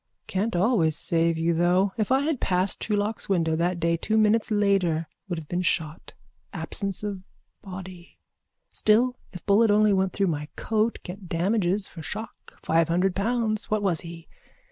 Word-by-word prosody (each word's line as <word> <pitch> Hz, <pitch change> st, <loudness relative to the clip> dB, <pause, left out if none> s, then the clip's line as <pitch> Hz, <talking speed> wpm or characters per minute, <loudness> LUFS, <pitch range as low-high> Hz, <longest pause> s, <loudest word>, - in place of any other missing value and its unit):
Can't 205 Hz, +3 st, -2 dB
always 175 Hz, -, +3 dB
save 165 Hz, 0 st, +1 dB
you, 165 Hz, +1 st, +1 dB
though. 180 Hz, +4 st, +2 dB
If 215 Hz, +1 st, -1 dB
I 265 Hz, +1 st, +4 dB
had 295 Hz, -2 st, -1 dB
passed 185 Hz, +1 st, 0 dB
Truelock's 210 Hz, 0 st, -2 dB
window 165 Hz, -4 st, +1 dB
that 175 Hz, +2 st, 0 dB
day 170 Hz, 0 st, +1 dB
two 215 Hz, +6 st, 0 dB
minutes 215 Hz, +1 st, +3 dB
later 195 Hz, -6 st, +1 dB, 0.2 s
would 175 Hz, -, -2 dB
have 160 Hz, -2 st, -7 dB
been 175 Hz, +3 st, -1 dB
shot. 165 Hz, -3 st, -2 dB, 0.4 s
Absence 200 Hz, -2 st, -4 dB
of 200 Hz, -3 st, -4 dB, 0.4 s
body. 185 Hz, -2 st, -10 dB, 0.5 s
Still 240 Hz, +4 st, +2 dB, 0.2 s
if 180 Hz, -3 st, -10 dB
bullet 210 Hz, +3 st, +4 dB
only 210 Hz, 0 st, +4 dB
went 190 Hz, -1 st, +1 dB
through 200 Hz, -, +1 dB
my 150 Hz, -4 st, -2 dB
coat 220 Hz, +1 st, 0 dB
get 185 Hz, 0 st, -9 dB
damages 190 Hz, +2 st, +1 dB
for 165 Hz, -, -10 dB
shock, 215 Hz, +7 st, -8 dB
five 165 Hz, 0 st, +2 dB
hundred 180 Hz, +2 st, +2 dB
pounds. 220 Hz, +1 st, -1 dB
What 215 Hz, -1 st, 0 dB
was 175 Hz, -5 st, +1 dB
he? 165 Hz, -1 st, -10 dB
190 Hz, 165 wpm, -26 LUFS, 170-215 Hz, 0.5 s, I